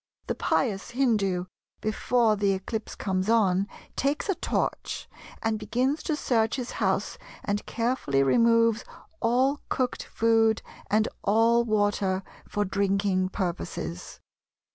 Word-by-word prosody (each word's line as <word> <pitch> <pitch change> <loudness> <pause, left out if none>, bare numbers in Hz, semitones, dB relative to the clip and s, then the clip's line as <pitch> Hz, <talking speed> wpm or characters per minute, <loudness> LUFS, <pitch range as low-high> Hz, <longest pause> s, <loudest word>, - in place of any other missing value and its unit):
The - - -1
pious 205 -7 0
Hindu, 210 -8 +1 0.3
before 220 +1 +2
the 200 -1 +2
eclipse 215 +4 -4
comes 190 0 -1
on, 200 -4 +3 0.3
takes 285 +8 0
a - - +4
torch, - - -2 0.4
and 220 -1 0
begins 250 +8 0
to 310 - -1
search 225 -6 +1
his 250 -2 -4
house - - -1 0.2
and 205 0 -1
carefully 230 - +1
removes 230 - +4 0.4
all 255 +5 +2
cooked 255 -1 -1
food, 225 -1 +2 0.3
and 215 +1 +3 0.2
all 230 +3 +4
water 205 -3 +1 0.3
for 205 0 0
drinking 195 -1 +1
purposes. 175 -2 -4
220 Hz, 120 wpm, -27 LUFS, 195-235 Hz, 0.4 s, a